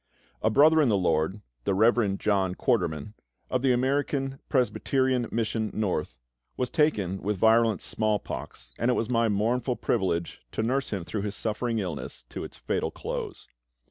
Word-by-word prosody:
A 110 Hz, -, +3 dB
brother 155 Hz, +7 st, +6 dB
in 140 Hz, -, +3 dB
the 105 Hz, -, +3 dB
LORD, 90 Hz, +2 st, +1 dB, 0.2 s
the 95 Hz, -, +1 dB
Rev. 110 Hz, -1 st, +3 dB
John 95 Hz, -3 st, +1 dB
Quarterman, 80 Hz, +4 st, 0 dB, 0.4 s
of 130 Hz, -, +1 dB
the 135 Hz, -1 st, +3 dB
American 135 Hz, +1 st, 0 dB
Presbyterian 130 Hz, 0 st, +1 dB
Mission 110 Hz, -1 st, -1 dB
North, 105 Hz, -4 st, -1 dB, 0.4 s
was 125 Hz, -1 st, -1 dB
taken 100 Hz, -, +1 dB
with 105 Hz, 0 st, -1 dB
virulent 110 Hz, +1 st, +4 dB
small 110 Hz, -1 st, +1 dB
pox, -, -, -8 dB
and 120 Hz, -, +2 dB
it 125 Hz, -, +3 dB
was 115 Hz, -, -1 dB
my 115 Hz, -1 st, +3 dB
mournful 115 Hz, +5 st, +1 dB
privilege 90 Hz, -, -1 dB
to 110 Hz, -, -1 dB
nurse 130 Hz, +4 st, 0 dB
him 95 Hz, -5 st, -3 dB
through 105 Hz, -, -3 dB
his 105 Hz, 0 st, -3 dB
suffering 115 Hz, +1 st, -1 dB
illness 90 Hz, -8 st, -4 dB
to -, -, -6 dB
its -, -, -9 dB
fatal -, -, -1 dB
close. -, -, -6 dB
110 Hz, 165 wpm, -27 LUFS, 100-125 Hz, 0.4 s, brother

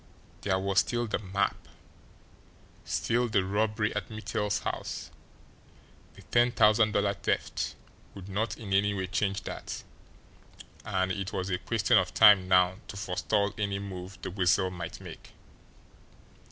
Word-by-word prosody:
There 95 Hz, -2 st, +1 dB
was 95 Hz, 0 st, +2 dB
still 120 Hz, +6 st, 0 dB
the 110 Hz, -, -2 dB
map, 100 Hz, 0 st, 0 dB, 1.3 s
still 120 Hz, +1 st, 0 dB
the 95 Hz, -3 st, +2 dB
robbery 105 Hz, +2 st, 0 dB
at 105 Hz, -4 st, -3 dB
Mittel's 105 Hz, -1 st, -2 dB
house -, -, -4 dB, 1.0 s
the -, -, -14 dB
ten 120 Hz, +1 st, +3 dB
thousand 110 Hz, -1 st, +4 dB
dollar 100 Hz, 0 st, +2 dB
"theft" -, -, -2 dB, 0.4 s
would 95 Hz, -1 st, -9 dB
not 105 Hz, +4 st, -2 dB
in 100 Hz, -4 st, -5 dB
any 100 Hz, +1 st, +3 dB
way 95 Hz, -1 st, -2 dB
change 95 Hz, +1 st, -1 dB
that, -, -, -6 dB, 1.0 s
and 95 Hz, 0 st, 0 dB
it 95 Hz, +1 st, -3 dB
was 95 Hz, 0 st, -2 dB
a 90 Hz, -, 0 dB
question 110 Hz, +3 st, +3 dB
of 95 Hz, -, -3 dB
time 100 Hz, -3 st, +7 dB
now 90 Hz, 0 st, +4 dB
to 100 Hz, -, -8 dB
forestall 100 Hz, +2 st, 0 dB
any 100 Hz, -2 st, -1 dB
move 95 Hz, -1 st, -7 dB
the -, -, -4 dB
Weasel 95 Hz, 0 st, +2 dB
might 90 Hz, -2 st, -6 dB
make. -, -, -11 dB
100 Hz, 140 wpm, -29 LUFS, 95-105 Hz, 1.3 s, time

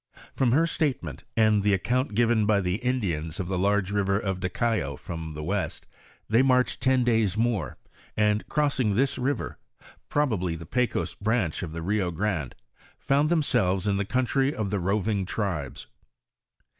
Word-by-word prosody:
From 125 Hz, -3 st, +2 dB
her 155 Hz, +6 st, +4 dB
statement, 155 Hz, -4 st, -2 dB
and 110 Hz, -2 st, +4 dB
the 100 Hz, 0 st, +3 dB
account 125 Hz, +4 st, -1 dB
given 115 Hz, -2 st, +3 dB
by 105 Hz, -2 st, +4 dB
the 90 Hz, 0 st, -1 dB
Indians 100 Hz, -10 st, -2 dB
of 95 Hz, -, -2 dB
the 95 Hz, -1 st, -1 dB
large 100 Hz, 0 st, +1 dB
river 100 Hz, -1 st, +1 dB
of 95 Hz, -3 st, -2 dB
Daycao 95 Hz, -, -1 dB
to 80 Hz, +1 st, -7 dB
the 75 Hz, -, -5 dB
west, 95 Hz, +4 st, -2 dB, 0.4 s
they 115 Hz, +3 st, +4 dB
marched 125 Hz, -1 st, +2 dB
ton 130 Hz, -1 st, +3 dB
days 110 Hz, -4 st, +2 dB
more, 115 Hz, -3 st, 0 dB, 0.4 s
and 105 Hz, 0 st, +1 dB
crossing 140 Hz, -8 st, +1 dB
this 135 Hz, +4 st, +1 dB
river, 130 Hz, -1 st, -2 dB, 0.5 s
probably 105 Hz, -, 0 dB
the 80 Hz, 0 st, -8 dB
Pecos 125 Hz, +8 st, -1 dB
branch 105 Hz, -6 st, -1 dB
of 85 Hz, -, -5 dB
the 80 Hz, 0 st, -5 dB
Rio 100 Hz, 0 st, 0 dB
Grande, 85 Hz, -, -2 dB, 0.4 s
found 145 Hz, +2 st, +2 dB
themselves 110 Hz, -, +1 dB
in 100 Hz, -1 st, +2 dB
the 100 Hz, -, 0 dB
country 130 Hz, +5 st, +1 dB
of 105 Hz, -3 st, -2 dB
the 100 Hz, -, 0 dB
roving 100 Hz, +2 st, 0 dB
tribes. 90 Hz, -, -3 dB
105 Hz, 160 wpm, -26 LUFS, 95-125 Hz, 0.5 s, her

